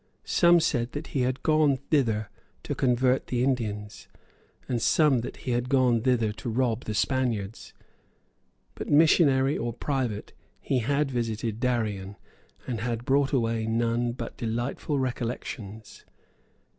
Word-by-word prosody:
Some 175 0 +5
said 120 -7 0
that 150 +2 -5
he 135 - +1
had 130 +1 -1
gone 155 -3 +3
thither 115 -8 0 0.3
to - - -3
convert 125 0 +1
the 125 -1 0
Indians, 105 -6 -2 0.6
and 120 -3 -1
some 150 0 +4
that 115 - -6
he 130 - -1
had 120 +1 -1
gone 125 -4 +3
thither 115 -3 +2
to 115 +3 -6
rob 120 0 0
the 105 - -3
Spaniards. 115 -3 -1 1.0
But, - - -7
missionary 145 -3 +4
or 120 0 -2
pirate, 125 -5 -3 0.3
he 130 - 0
had 140 +4 0
visited 115 -2 -2
Darien, 105 -6 -1 0.5
and 120 -3 -3
had 120 0 -3
brought 140 0 +2
away 115 -4 0
none 115 +1 0
but 120 -1 -7
delightful 120 +5 -2
recollections. 115 -4 -5
120 Hz, 135 wpm, -27 LUFS, 115-135 Hz, 1.0 s, Some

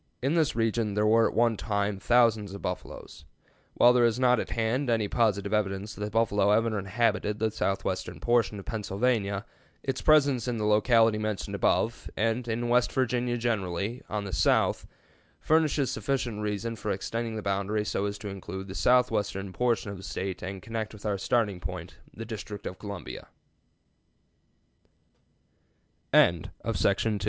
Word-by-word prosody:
In 135 +4 0
this 160 -7 +2
region 115 -2 0
there 105 0 +2
were 115 +1 +5
at - - -5
one 115 -1 +3
time 100 -1 -1
thousands 110 -3 +3
of 100 - -9
buffaloes. 90 -4 -6 0.5
While 120 - +6
there 125 -1 +4
is 120 +1 +2
not 125 -2 +4
at - - -4
hand 120 +4 0
any 110 -3 +1
positive 100 -3 +1
evidence 100 -1 -1
that 105 - -6
the 105 - -2
buffalo 105 -2 +2
ever 110 0 +2
inhabited 105 +1 0
the 110 0 0
southwestern 95 -5 -2
portion 120 +1 +1
of 100 - -9
Pennsylvania, 105 -1 -1 0.4
its 135 -1 -2
presence 140 -6 +4
in 120 -2 -1
the 105 - -1
locality 110 +1 +4
mentioned 105 -2 -3
above, 115 +1 0
and 115 +2 0
in 120 +1 -1
West 120 0 +3
Virginia 125 -1 0
generally, 105 -1 -2
on 105 -1 -2
the 95 -2 -6
south, - - +2 0.5
furnishes 155 -4 +2
sufficient 115 -1 -2
reason 105 +2 -2
for 105 - -5
extending 115 +4 -3
the 110 - -5
boundary 100 +2 -1
so 100 - -1
as 100 0 -4
to 105 - -8
include 95 0 -7
the - - -6
southwestern 100 -5 +1
portion 120 -3 0
of 100 - -7
the 95 - -11
State 95 +1 -4
and 95 0 -6
connect 110 -1 -4
with 105 - -13
our 100 -2 -1
startin 105 -5 0
110 Hz, 145 wpm, -28 LUFS, 100-120 Hz, 0.5 s, While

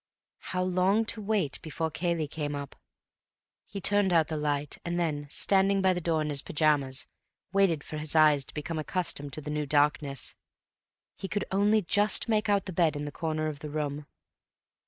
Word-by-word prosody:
How 185 - +1
long 185 +4 +2
to 220 - -8
wait 200 -8 0
before 160 0 -3
Cayley 170 -1 -1
came 145 -1 -4
up? 140 -1 -7 0.9
He 200 - -6
turned 205 -1 +3
out 165 -3 +3
the 160 - -2
light, 145 -1 -2
and 175 0 -2
then, 150 -4 -2
standing 195 +4 +2
by 190 -1 +3
the 180 - -3
door 160 -2 +1
in 150 - -3
his 140 -2 +3
pyjamas, 145 -3 +1 0.5
waited 185 -6 +2
for 155 - -6
his 155 +1 -3
eyes 150 -3 +5
to - - -10
become 155 +2 -4
accustomed 150 -3 -2
to 155 - -4
the 150 +1 -6
new 150 -1 -2
darkness.... 145 -2 +1 0.8
He 195 - -5
could 205 0 -2
only 205 +2 +3
just 205 +3 +3
make 215 -2 +1
out 200 -1 +2
the 190 - -5
bed 165 -2 +2
in 145 0 -4
the 145 - -5
corner 155 0 -2
of 155 -2 -4
the 150 - -7
room. 145 -1 -3
155 Hz, 190 wpm, -28 LUFS, 150-190 Hz, 0.9 s, eyes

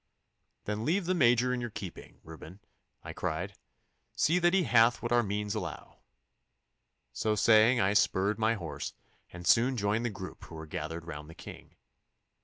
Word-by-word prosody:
'Then 105 0 -3
I - - -4
leave 175 - 0
the 185 - +1
Major 125 -5 +3
in 125 - -2
your 120 - -4
keeping, 95 -4 -9
Reuben,' 80 +3 -11 0.4
I - - -7
cried. - - -3 0.6
'See 170 +3 +2
that 175 +1 +3
he 190 - +3
hath 120 -3 +3
what 120 - -3
our 120 0 +4
means 105 -1 -3
allow.' 90 -8 -6 1.1
So 105 - 0
saying 110 +4 +5
I 100 0 +2
spurred 105 0 +2
my 110 +1 +2
horse, 80 -7 -6 0.4
and 85 0 -9
soon 125 +5 +4
joined 105 +2 0
the 120 - 0
group 95 -3 -9
who 85 - -11
were 80 0 -7
gathered 80 +2 -6
round 75 -2 -8
the 80 - -12
King. - - -12
110 Hz, 175 wpm, -30 LUFS, 90-120 Hz, 1.1 s, saying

